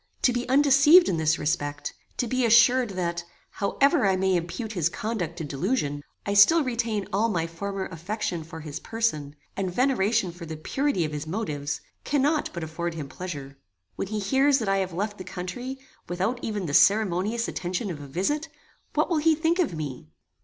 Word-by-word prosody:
To 250 - +4
be 245 0 -3
undeceived 285 +5 +6
in 170 - 0
this 160 0 +2
respect, 145 -2 -2 0.2
to - - 0
be 255 +2 0
assured 235 +2 +5
that, 170 -1 -2 0.3
however 275 - +2
I 190 - +3
may 190 0 +2
impute 175 +6 -3
his 170 -4 +1
conduct 180 -5 -3
to 165 - -4
delusion, 145 - -1 0.2
I 200 - -1
still 300 +11 +7
retain 230 -5 -1
all 220 +4 +2
my 170 -6 0
former 190 +4 -4
affection 175 0 -4
for 160 0 -9
his 150 -2 -6
person, 155 -11 -2 0.2
and 190 -2 -2
veneration 220 -5 +1
for 170 -1 -10
the 160 0 -6
purity 265 - 0
of 155 - -4
his 150 +1 -5
motives, 155 -7 -3 0.2
cannot 295 +2 +1
but 170 - -5
afford 165 +2 -4
him 145 -4 -6
pleasure. 140 -5 -7 0.4
When - - -3
he 215 +2 -3
hears 270 +7 +3
that 225 -6 -3
I 195 0 +2
have 190 -1 -1
left 205 +4 -3
the - - -5
country, 190 +9 -6 0.3
without 190 +8 -1
even 210 -4 -3
the 145 - -4
ceremonious 210 +4 +3
attention 185 +3 -3
of 150 -4 -7
a 145 - -8
visit, 290 - -1 0.5
what - - +2
will 340 - +1
he 320 +1 +4
think 325 +3 +1
of 310 - +1
me? 135 - -6
195 Hz, 190 wpm, -26 LUFS, 165-245 Hz, 0.5 s, still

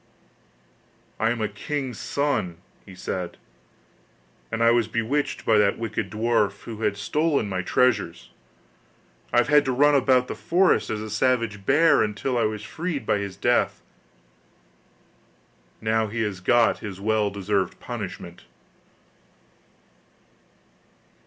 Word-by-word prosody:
'I 110 - +2
am 120 -1 -2
a 110 - +1
king's 125 +3 -4
son,' 140 - -1 0.3
he 95 - -11
said, 90 -1 -5 1.1
'and 115 +1 0
I 115 - +6
was 120 -2 +2
bewitched 115 +6 -2
by 110 -2 +4
that 100 -1 +2
wicked 110 -3 -3
dwarf, 105 -1 0
who 110 -1 -8
had 105 -2 0
stolen 145 +4 0
my 95 -2 -2
treasures; 100 -4 0 1.0
I - - +1
have 120 - +4
had 150 0 +6
to 130 - 0
run 145 +4 +4
about 130 -2 +3
the - - -4
forest 180 +2 +2
as 110 -1 -3
a 110 - -6
savage 110 -3 0
bear 160 +4 +5
until 110 +5 -1
I 120 - +2
was 105 -1 -3
freed 160 - -4
by 105 - +1
his 100 -2 -5
death. - - +1 2.0
Now 110 0 +1
he 110 +2 -2
has 100 -4 -3
got 115 +5 +3
his 100 -3 -7
well 105 0 +1
deserved 100 -1 -2
punishment. - - -7
110 Hz, 135 wpm, -24 LUFS, 100-130 Hz, 2.0 s, I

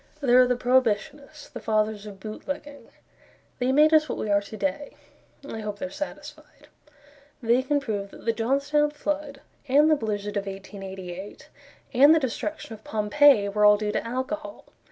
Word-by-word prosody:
There 255 -3 +5
are 250 - +4
the 250 - +1
Prohibitionists; 260 +4 0
The 240 - -6
Fathers 215 -1 -1
of 200 -2 -10
Bootlegging. 280 +7 -7 0.7
They 250 +1 +1
made 305 +3 +5
us 310 -2 +4
what - - -3
we 210 - -3
are 200 0 +3
to 210 +2 -10
day 290 +2 -3 0.5
I 225 - -6
hope 210 -1 -5
they're 185 - -5
satisfied. 295 - -9 0.7
They 240 0 +2
can 285 +2 0
prove 210 -7 -4
that - - -14
the 230 - +2
Johnstown 280 +6 +1
flood, 295 -1 -4 0.3
And 295 +4 +4
the - - +6
blizzard 205 -4 -3
of 200 0 -3
1888, 195 -1 -8 0.4
And 285 +5 +7
the - - +3
destruction 265 0 -4
of 215 0 -12
Pompeii 215 +1 +4
Were 210 +1 0
all 210 0 +7
due 210 0 -2
to - - -2
alcohol. 280 +6 -5
240 Hz, 170 wpm, -25 LUFS, 210-285 Hz, 0.7 s, And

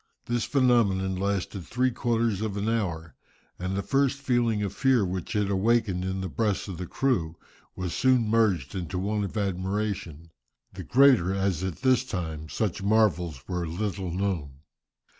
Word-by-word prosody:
This 120 -1 -1
phenomenon 115 -8 +2
lasted 100 0 -2
three 125 +9 0
quarters 115 -4 0
of 105 -2 -2
an 100 +2 -2
hour, 85 -8 -2 0.5
and 95 +1 -2
the 100 - -1
first 135 0 +1
feeling 120 -5 +1
of 100 - -3
fear 130 -6 +3
which 90 +1 -4
it 105 -1 +1
awakened 100 -2 +1
in 95 +1 -2
the 95 - -3
breasts 105 +2 -1
of 90 -3 -6
the 90 - -4
crew 90 -13 0 0.4
was 90 -2 -3
soon 130 -3 +3
merged 105 -11 +2
in 90 -2 -3
one 100 +5 -1
of 100 +2 -4
admiration, 95 -4 -3 0.4
the - - -7
greater 125 -9 +4
as 95 -3 0
at 90 -2 -4
this 130 -1 +4
time 80 -9 -5
such 105 -4 -2
marvels 95 - +1
were 90 -2 -2
little 95 +2 -3
known. 85 -7 -3
100 Hz, 160 wpm, -27 LUFS, 90-115 Hz, 0.5 s, greater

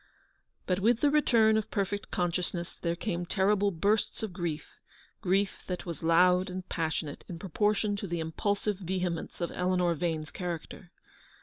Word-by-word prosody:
But 180 0 +1
with 225 +4 +3
the 290 - +4
return 230 -7 +4
of 215 - -2
perfect 200 0 -2
consciousness 175 0 -2
there 170 -1 0
came 175 -1 -2
terrible 200 +2 +2
bursts 200 +5 0
of 210 -5 -3
grief 170 -4 -4 0.2
— - - -29
grief 195 +2 +1
that 180 0 -4
was 170 -5 -5
loud 180 +3 +4
and 185 0 -6
passionate 160 -3 -2
in 175 - -5
proportion 205 +3 +1
to 200 - -4
the 170 -1 -2
impulsive 200 +5 -1
vehemence 180 -2 -3
of 170 - -1
Eleanor 180 -1 +1
Vane's 160 -2 -2
character. 175 0 -5
180 Hz, 160 wpm, -30 LUFS, 170-205 Hz, 0.2 s, the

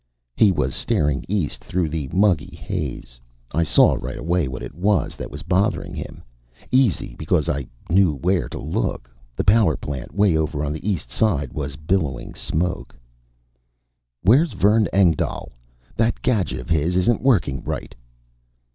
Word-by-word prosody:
He 105 - +5
was 65 -7 -1
staring 75 -2 0
east 95 -6 -1
through 90 -2 -1
the 75 -3 -3
muggy 95 -5 +2
haze. - - -5 0.3
I 80 - +1
saw 75 -3 +5
right - - -5
away 85 -1 0
what 65 0 -6
it - - -7
was 95 +2 0
that - - -7
was 75 0 -8
bothering 95 +5 0
him - - -7 0.5
easy, 125 - +2
because 80 0 +1
I 70 -3 -2 0.2
knew 90 -3 +3
where 90 +6 0
to - - -6
look. - - -3 0.2
The - - -1
power 100 -7 +4
plant 70 -4 -6
way 100 -4 +3
over 75 -1 -1
on 75 - -2
the 80 +7 -4
East 80 -11 -3
Side 75 - 0
was 70 -2 -4
billowing 75 -3 -2
smoke. 90 +3 -3 1.3
"Where's 130 - +4
Vern 105 +3 +3
Engdahl? 90 -5 +1 0.5
That 115 +1 0
gadget 110 -7 0
of 65 - -8
his 80 +3 +1
isn't 95 +6 +2
working 85 - +2
right!" - - -5
85 Hz, 155 wpm, -22 LUFS, 75-100 Hz, 1.3 s, He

